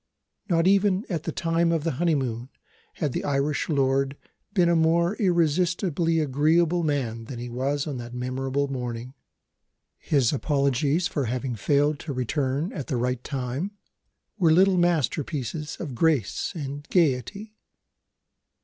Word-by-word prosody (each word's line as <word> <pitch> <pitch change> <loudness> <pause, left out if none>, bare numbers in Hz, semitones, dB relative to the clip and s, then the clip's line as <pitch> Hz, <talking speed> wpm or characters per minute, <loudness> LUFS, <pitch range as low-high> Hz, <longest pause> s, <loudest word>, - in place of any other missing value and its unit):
Not 165 -2 +3
even 195 +1 +3
at 165 -3 -2
the 165 - -1
time 165 +1 +1
of 165 -3 0
the 165 - 0
honeymoon 130 -8 0 0.5
had 150 -4 -1
the - - -2
Irish 145 +2 0
lord 135 -1 +1 0.3
been 180 -5 +3
a 170 - +3
more 170 +4 +3
irresistibly 175 -2 +1
agreeable 160 +4 +2
man 130 -8 -2
than 125 +1 -7
he 120 +1 -6
was 135 +4 -1
on 145 -4 -4
that 120 0 -7
memorable 130 +3 -2
morning. 125 -2 -5 0.9
His 135 -5 +2
apologies 140 +3 +1
for 145 -6 -2
having 125 +1 -2
failed 145 +6 +1
to 150 - -5
return 135 - -1
at 140 - -5
the 130 - -1
right 125 0 -1
time 140 +9 -4 0.6
were 165 -4 +4
little 185 +2 +5
masterpieces 150 -3 -1
of 145 -7 -5
grace 145 - +1
and 145 -2 -5
gaiety. 175 - 0
145 Hz, 140 wpm, -25 LUFS, 130-170 Hz, 0.9 s, little